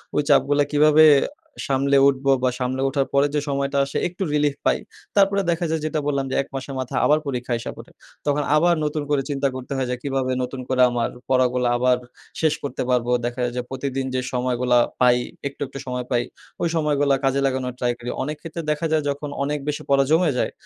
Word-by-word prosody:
ওই 150 Hz, -, +3 dB
চাপগুলা 145 Hz, +1 st, +4 dB
কীভাবে 155 Hz, +1 st, +6 dB, 0.6 s
সামলে 140 Hz, +1 st, +2 dB
উঠবো 135 Hz, 0 st, +2 dB
বা 130 Hz, -, +4 dB
সামলে 130 Hz, +1 st, -1 dB
ওঠার 135 Hz, 0 st, 0 dB
পরে 140 Hz, +1 st, +4 dB
যে -, -, +3 dB
সময়টা 140 Hz, 0 st, -1 dB
আসে 140 Hz, -, -4 dB
একটু 180 Hz, +2 st, -5 dB
relief 145 Hz, -1 st, +2 dB
পাই। -, -, +3 dB, 0.4 s
তারপরে 200 Hz, 0 st, +4 dB
দেখা 170 Hz, +1 st, -1 dB
যায় 160 Hz, -1 st, -1 dB
যেটা 155 Hz, 0 st, -1 dB
বললাম 140 Hz, -2 st, 0 dB
যে -, -, -1 dB
১ 135 Hz, -, -8 dB
মাসের 135 Hz, +1 st, -5 dB
মাথা 130 Hz, -1 st, -4 dB
আবার 150 Hz, +1 st, +4 dB
পরীক্ষা 125 Hz, -2 st, -3 dB
আইসা 115 Hz, -, -5 dB
পরে। -, -, -12 dB, 0.4 s
তখন 145 Hz, 0 st, +1 dB
আবার 170 Hz, +3 st, +4 dB
নতুন 150 Hz, 0 st, -2 dB
করে 145 Hz, -2 st, +2 dB
চিন্তা 140 Hz, -1 st, 0 dB
করতে 130 Hz, +1 st, -8 dB
হয় 130 Hz, -1 st, -1 dB
যে, 125 Hz, -, 0 dB
"কিভাবে 135 Hz, -2 st, -1 dB
নতুন 130 Hz, +1 st, -5 dB
করে 130 Hz, -1 st, +2 dB
আমার 120 Hz, -1 st, 0 dB, 0.2 s
পড়াগুলা 125 Hz, -1 st, +2 dB
আবার 125 Hz, 0 st, +3 dB, 0.4 s
শেষ 155 Hz, -2 st, +3 dB
করতে 140 Hz, -, -4 dB
পারবো।" 125 Hz, -1 st, +1 dB
দেখা 120 Hz, +1 st, -4 dB
যায় 120 Hz, 0 st, -1 dB
যে -, -, 0 dB
প্রতিদিন 135 Hz, 0 st, -3 dB
যে 130 Hz, -, +1 dB
সময়গুলা 125 Hz, 0 st, +1 dB, 0.2 s
পাই; 125 Hz, -1 st, +5 dB, 0.3 s
একটু, 140 Hz, -, -11 dB
একটু 135 Hz, +1 st, -8 dB
সময় 125 Hz, -1 st, -3 dB
পাই। 120 Hz, 0 st, +2 dB, 0.4 s
ওই -, -, +2 dB
সময়গুলা 145 Hz, -3 st, +2 dB
কাজে 135 Hz, +1 st, +2 dB
লাগানোর 130 Hz, -2 st, -1 dB
ট্রাই 120 Hz, -1 st, +1 dB
করি। 120 Hz, 0 st, -7 dB
অনেক 150 Hz, +2 st, -3 dB
ক্ষেত্রে 165 Hz, 0 st, -6 dB
দেখা 150 Hz, +2 st, -2 dB
যায় 155 Hz, -1 st, +2 dB
যখন 145 Hz, +1 st, -3 dB
অনেক 145 Hz, +1 st, -1 dB
বেশি 150 Hz, 0 st, -2 dB
পড়া 140 Hz, 0 st, +4 dB
জমে 165 Hz, -1 st, +4 dB
যায়, -, -, 0 dB
140 Hz, 210 wpm, -22 LUFS, 125-150 Hz, 0.6 s, কীভাবে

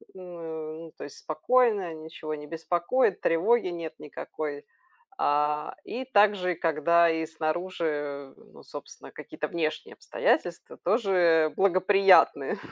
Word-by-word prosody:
ну, 165 Hz, -3 st, -8 dB
то -, -, -8 dB
есть 145 Hz, -, -12 dB
спокойно, 205 Hz, +2 st, +1 dB
ничего 155 Hz, 0 st, -7 dB
не 150 Hz, 0 st, -10 dB
беспокоит, 175 Hz, -, 0 dB
тревоги 205 Hz, +7 st, +2 dB
нет 170 Hz, -2 st, -5 dB
никакой, 150 Hz, 0 st, -7 dB, 0.5 s
а, 150 Hz, +1 st, 0 dB
и 255 Hz, -, -5 dB
также, 205 Hz, -6 st, +3 dB
когда 165 Hz, +1 st, +3 dB
и 160 Hz, 0 st, -1 dB
снаружи, 155 Hz, -4 st, -3 dB
ну, -, -, -18 dB
собственно, -, -, -11 dB
какие-то -, -, -6 dB
внешние 170 Hz, -, -3 dB
обстоятельства -, -, -1 dB
тоже 170 Hz, -7 st, +2 dB
благоприятные. 195 Hz, 0 st, +4 dB
165 Hz, 110 wpm, -27 LUFS, 155-190 Hz, 0.5 s, благоприятные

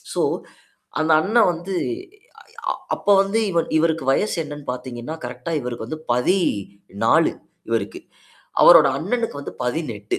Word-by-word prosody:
So -, -, 0 dB, 0.8 s
அந்த 160 Hz, -, +2 dB
அண்ணன் 220 Hz, +3 st, +3 dB
வந்து, 175 Hz, +3 st, -5 dB, 1.0 s
அ -, -, 0 dB, 0.2 s
அப்ப -, -, -15 dB
வந்து 195 Hz, +3 st, 0 dB
இவ 170 Hz, -, +2 dB, 0.2 s
இவருக்கு 160 Hz, -2 st, +1 dB
வயசு 210 Hz, +10 st, +1 dB
என்னன்னு 145 Hz, -2 st, -9 dB
பார்த்தீங்கன்னா, 125 Hz, +3 st, -6 dB
கரெக்ட்டா 125 Hz, +7 st, -5 dB
இவருக்கு 120 Hz, -2 st, -5 dB
வந்து 155 Hz, -, -5 dB
14 105 Hz, -, +1 dB, 0.4 s
இவருக்கு. 115 Hz, -3 st, -2 dB, 0.6 s
அவரோட 160 Hz, -5 st, +9 dB
அண்ணனுக்கு 225 Hz, -2 st, -2 dB
வந்து -, -, -7 dB
18 120 Hz, -7 st, -3 dB
150 Hz, 125 wpm, -22 LUFS, 120-175 Hz, 1.0 s, அவரோட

